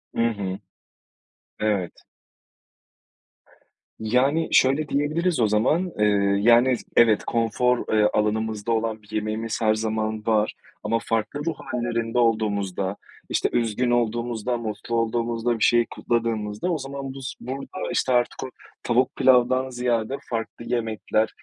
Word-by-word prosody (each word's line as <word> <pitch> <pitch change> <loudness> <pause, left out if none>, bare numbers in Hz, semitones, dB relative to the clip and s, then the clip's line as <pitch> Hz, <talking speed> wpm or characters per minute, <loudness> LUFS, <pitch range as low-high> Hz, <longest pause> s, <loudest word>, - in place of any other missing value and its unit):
Hı - - +1
hı. 100 -3 -4 1.0
Evet. 100 -5 0 2.1
Yani, 130 +8 +2
şöyle 135 +4 +4
diyebiliriz 155 +3 0
o 110 - +4
zaman, 150 - +1
eee, 105 - +4 0.4
yani, 120 +3 +5
s - - -12
evet, 115 -3 +5
konfor, 120 +2 +1
eee, 105 -1 +4
alanımızda 110 +1 0
olan 110 -1 -1
bir 105 0 -19
yemeğimiz 110 +1 -2
her 110 -1 +4
zaman 110 0 -2
var, 110 -1 +2 0.3
ama 115 +2 +1
farklı 115 +5 -1
ruh 165 - -1 0.2
hâllerinde 120 -1 -2
olduğumuzda, 100 -4 0 0.3
işte, - - +1
üzgün 120 +1 +1
olduğumuzda, 120 0 0
mutlu 115 +1 -4
olduğumuzda, 115 0 0
bir - - +1
şeyi 120 -1 +4
kutladığımızda 115 +2 -1
o 165 - 0
zaman 135 -1 -6
bus 135 -2 -6
burada, 135 +8 -5
işte, 130 - +1
artık 120 0 +1
o 130 - -5 0.3
tavuk 125 +2 +1
pilavdan 130 +1 +3
ziyade 120 -1 -1
farklı 115 0 -4
yemekler 110 -2 0
115 Hz, 130 wpm, -24 LUFS, 110-125 Hz, 2.1 s, yani